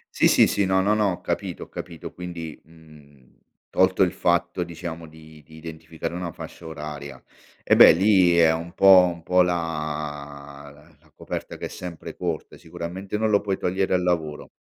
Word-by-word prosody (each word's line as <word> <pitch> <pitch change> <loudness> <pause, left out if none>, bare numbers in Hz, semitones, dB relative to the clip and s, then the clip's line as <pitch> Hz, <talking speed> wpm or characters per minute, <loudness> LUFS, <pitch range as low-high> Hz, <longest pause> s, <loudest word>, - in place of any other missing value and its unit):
Sì, - - +4
sì, - - +5
sì, 100 - 0
no, 95 0 +2
no, 105 +3 +2
no, 105 -2 +2
ho 90 - -6
capito, - - -4
ho - - -14
capito. 85 -3 -8
Quindi, 85 -3 -8
mhmm, 75 -5 -20 0.3
tolto 95 +1 +2
il 90 -2 +4
fatto, 85 0 0
diciamo, 85 -1 -7
di 80 -1 -16
di 80 +1 -16
identificare 80 +1 -7
una 90 -1 -4
fascia 85 - -11
oraria. 75 -4 -8 0.4
Eh, - - +3
beh, - - +10
lì 95 -1 +4
è 85 -1 +5
un 85 +1 -4
po' 95 -2 +7
un 85 - -13
po' 90 +2 +3
la 75 -4 -5
la - - -27
coperta - - -6
che - - -6
è - - -3
sempre 90 -2 -8
corta, 85 -3 -4
sicuramente 90 +4 -6
non 110 +1 0
lo 100 -1 +3
puoi 100 -2 -2
togliere 95 +1 0
al 90 - +2
lavoro. 80 -4 -2
85 Hz, 180 wpm, -24 LUFS, 80-90 Hz, 0.4 s, beh